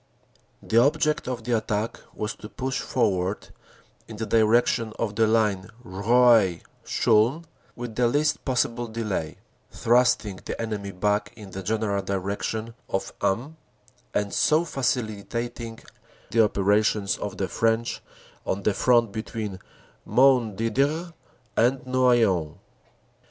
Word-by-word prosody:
"The 115 - +3
object 150 +3 +2
of 125 -2 -4
the 120 +1 0
attack 110 0 -2 0.2
was 105 - -3
to 105 - -10
push 130 +6 -3
forward 95 -5 -1 0.6
in 110 - -9
the 110 - -3
direc 115 +2 +4
tion 115 -2 -1
of 105 -3 -2
the 110 +1 +3
line 105 -4 +1
Roye 110 -2 +3 0.2
Chaulnes 125 +10 +2 0.3
with 120 -1 -6
the 120 +2 +2
least 145 +5 +1
possible 120 -2 0
delay, 110 -8 -3 0.3
thrusting 115 -4 +2
the - - -5
enemy 105 -3 -3
back 105 +3 0
in 105 -4 -11
the 95 - -6
general 100 0 -1
direction 100 +4 -3 0.2
of 95 - -3
Ham, 115 +11 -1 0.5
and 105 -1 -1
so 155 +3 +3
facilitating 115 -3 -3 0.5
the 115 -1 +5
operations 105 0 +1
of 105 - -5
the 95 - -1
French 115 +2 0 0.4
on 100 +1 -2
the 105 - +2
front 120 -1 +3
between 110 -2 -5 0.5
Montdidier 130 - +2 0.4
and 125 +3 +2
Noyon." 120 - +2
110 Hz, 125 wpm, -25 LUFS, 100-120 Hz, 0.6 s, the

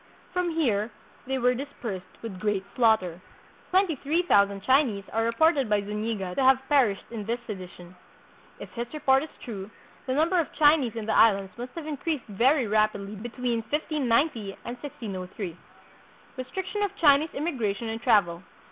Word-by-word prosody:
From 360 -1 0
here 235 -10 +1 0.4
they 265 0 0
were 250 0 +3
dis 270 +4 -4
persed 190 -6 -6
with 200 -5 -6
great 205 -1 -1
slaughter. 215 -8 +2 0.5
Twenty 370 -3 +3
three 315 +7 0
thousand 200 - +3
Chinese 260 -6 +3
are 225 +1 +1
reported 275 +1 +3
by 210 -1 +3
Zuniga 210 -2 -3
to 270 - -1
have 265 0 +6
perished 250 -9 +3
in 225 -3 -5
this 230 +3 -1
sedition. 185 -4 -9 0.6
If - - -9
his 235 0 -4
report 270 -3 +3
is 310 - -6 0.2
true, 200 -4 -6 0.4
the 260 - 0
number 335 +5 +3
of 330 - -1
Chinese 290 -6 +4
in 225 -2 -4
the 220 - 0
Islands 195 -4 +4
must 245 +1 -7
have 330 -3 -6
increased 305 -1 -3
very 245 +6 +2
rapidly 210 -1 0
between 240 +2 -2
1590 275 -7 0
and 240 - -4
1603. 195 - -6 0.8
Restriction 375 +10 -4
of 410 - +2
Chinese 295 0 +5
Immigration 235 -9 -2
and 225 +1 -4
Travel. 185 -8 +3
235 Hz, 160 wpm, -27 LUFS, 205-285 Hz, 0.8 s, have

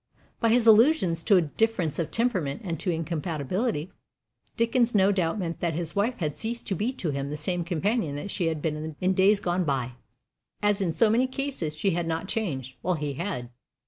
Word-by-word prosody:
By 230 - +2
his 235 0 +4
allusions 220 - +5
to 200 - +6
a 175 - +4
difference 170 -1 0
of 165 -2 -1
temperament 190 - -1
and 170 -5 -3
to - - -2
incompatibility, 165 - -2 0.7
Dickens 235 0 +2
no 195 0 +5
doubt 180 -2 0
meant 170 -4 -3
that 170 -3 -1
his 170 +1 -4
wife 220 +5 +1
had 150 -4 -2
ceased 235 +1 -4
to 195 - 0
be 215 +8 -1
to 175 - -3
him 140 0 -3
the 150 - -4
same 175 +3 -1
companion 175 0 -1
that 150 +7 -5
she 175 - -1
had 160 -2 -2
been 155 0 -3
in 185 +1 +2
days 195 +2 +4
gone 180 -1 0
by. 135 -5 -1 0.7
As 205 -1 +1
in 180 -4 +1
so 215 +6 +3
many 245 +4 +3
cases, 260 - -3
she 195 +5 +1
had 170 0 -1
not 165 +3 -2
changed, 135 - -3
while 180 +1 0
he 150 -2 -3
had. 135 -6 -4
175 Hz, 205 wpm, -27 LUFS, 155-215 Hz, 0.7 s, to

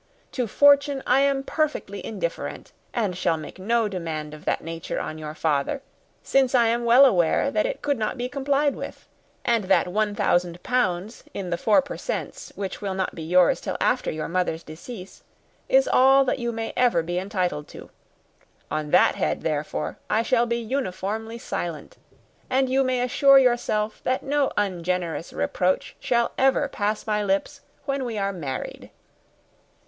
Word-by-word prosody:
To 250 -3 -2
fortune 280 +3 +4
I 255 +2 +4
am 275 -1 +2
perfectly 290 -10 -2
indifferent, 185 -6 -5 0.2
and 210 -7 -1
shall 170 -2 +1
make 155 +4 -9
no 225 +3 +1
demand 160 -6 -5
of 150 - -12
that - - 0
nature 165 0 -4
on 155 - -5
your 155 0 -6
father, 155 - -1 0.4
since 265 -1 +2
I 235 -2 +4
am 235 +1 0
well 245 +4 +7
aware 175 -11 +3
that - - +1
it - - -5
could 285 -4 0
not 215 +4 -2
be 245 0 -2
complied 280 +2 0
with; - - -8 0.4
and 230 -4 +2
that 185 -2 +3
one 210 +2 0
thousand 175 -4 0
pounds 210 -4 -1
in 185 -3 -4
the - - +2
4 215 +8 +3
per 280 - -7
cents., - - -5
which 195 -2 -5
will 195 -2 -3
not 190 -1 -2
be - - -8
yours 175 +2 +3
till - - -3
after - - +1
your 155 0 -3
mother's 170 -2 -1
decease, 185 +5 -10 0.5
is - - +4
all 270 +1 +5
that 265 - 0
you 235 -1 -1
may 225 -1 -4
ever 235 -10 +3
be 175 +2 -2
entitled 185 -6 -2
to. - - -12 0.8
On 155 -1 -2
that 180 +4 +5
head, - - -1
therefore, 150 -1 -3
I 220 +2 +2
shall 240 0 +2
be 235 0 0
uniformly 220 -2 -3
silent: 170 -8 -5 0.5
and 265 0 +2
you 270 +1 +3
may 255 -1 0
assure 275 +2 +5
yourself 240 -4 +1
that 255 +1 0
no 285 0 +1
ungenerous 180 -3 -1
reproach 185 +1 -1
shall 235 -1 +1
ever 270 0 +3
pass 210 +1 -2
my 210 -1 0
lips 200 +9 -1 0.2
when 275 -1 -1
we 235 -3 -4
are 200 0 -1
married." 145 -8 -6
215 Hz, 170 wpm, -24 LUFS, 180-255 Hz, 0.8 s, well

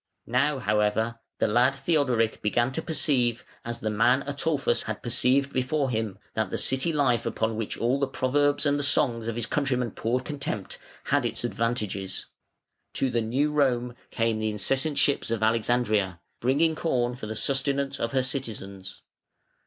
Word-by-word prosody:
Now, 135 +5 +1
however, 110 0 0 0.2
the - - +2
lad 120 +5 +3
Theodoric 135 -6 +1
began 120 +4 +1
to 160 - -1
perceive, 125 -7 0 0.2
as 120 0 -5
the 110 - -1
man 125 +5 +3
Ataulfus 145 +1 0
had 110 -1 -5
perceived 130 +3 +2
before 130 +1 0
him, 110 -4 -2 0.2
that 110 -3 -1
the - - -2
city 130 +5 +2
life 135 -6 +2
upon 110 0 -1
which 110 -1 -3
all 125 +4 +1
the 140 - +1
proverbs 145 +3 +1
and 145 0 +2
the - - -1
songs 125 -5 +2
of 115 - -2
his 120 -1 -2
countrymen 125 -4 0
poured 125 +5 -1
contempt, 140 -9 -4 0.2
had - - +1
its - - -3
advantages. 105 -5 -2 0.7
To 135 - 0
the 120 - +1
New 130 +7 0
Rome 125 -5 +1
came 115 -2 0
the 110 0 0
incessant 135 +8 -1
ships 140 - +2
of 115 -1 -1
Alexandria, 110 -5 +1 0.2
bringing 145 +6 +2
corn 125 -7 0
for 120 -3 -7
the 110 - -4
sustenance 140 +3 0
of 115 - -1
her 130 -1 +2
citizens. 100 -8 -5
125 Hz, 165 wpm, -27 LUFS, 110-140 Hz, 0.7 s, lad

